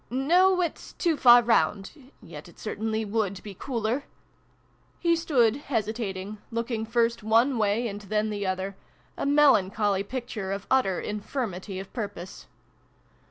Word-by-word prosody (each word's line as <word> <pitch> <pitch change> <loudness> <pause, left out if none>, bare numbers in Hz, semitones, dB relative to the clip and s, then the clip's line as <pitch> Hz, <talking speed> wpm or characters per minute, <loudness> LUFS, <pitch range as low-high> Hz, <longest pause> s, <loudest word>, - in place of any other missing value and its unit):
" - - -37
No, 355 +9 +3
it's 340 -3 -4
too 335 -3 0
far 245 -3 +7
round. 200 -3 +1 0.3
Yet - - -10
it - - -19
certainly 220 0 -3
would 200 -3 -2
be 205 - -8
cooler 235 +4 -2 0.9
He 340 -1 +2
stood, 255 -9 +2
hesitating, 215 -6 -3
looking 230 -1 -3
first 230 0 +1
one 230 +4 +3
way 215 +3 +1
and 205 -1 -6
then 215 +2 -1
the 205 -2 -3
other 190 +1 -3 0.4
a - - -2
melan 280 -10 +5
choly 200 -2 0
picture 235 -6 -4
of 195 0 -4
utter 225 -9 +2
infirmity 210 -3 -4
of 195 - -10
purpose 200 -6 -6
220 Hz, 145 wpm, -26 LUFS, 200-250 Hz, 0.9 s, far